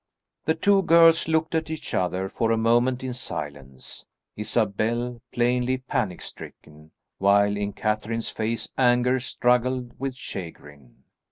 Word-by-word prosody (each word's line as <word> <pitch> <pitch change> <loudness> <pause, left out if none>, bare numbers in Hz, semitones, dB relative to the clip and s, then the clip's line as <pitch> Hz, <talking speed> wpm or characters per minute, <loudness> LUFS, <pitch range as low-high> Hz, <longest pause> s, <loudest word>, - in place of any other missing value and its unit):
The 160 - +2
two 195 +4 +3
girls 165 -2 +5
looked 160 0 0
at 160 -1 -1
each 160 -1 -6
other 90 +1 0
for 115 +3 -1
a 115 - +2
moment 120 +3 +2
in 130 -1 -3
silence, 70 - -7 0.3
Isabel 115 +3 -1
plainly 125 +1 +1
panic 120 -7 -3
stricken, 75 +1 -12 0.3
while 100 +1 +4
in 100 0 -3
Catherine's 110 +2 -2
face 110 0 -3
anger 125 0 +3
struggled 125 0 0
with 135 -1 -3
chagrin. 75 - -10
120 Hz, 125 wpm, -25 LUFS, 100-130 Hz, 0.3 s, girls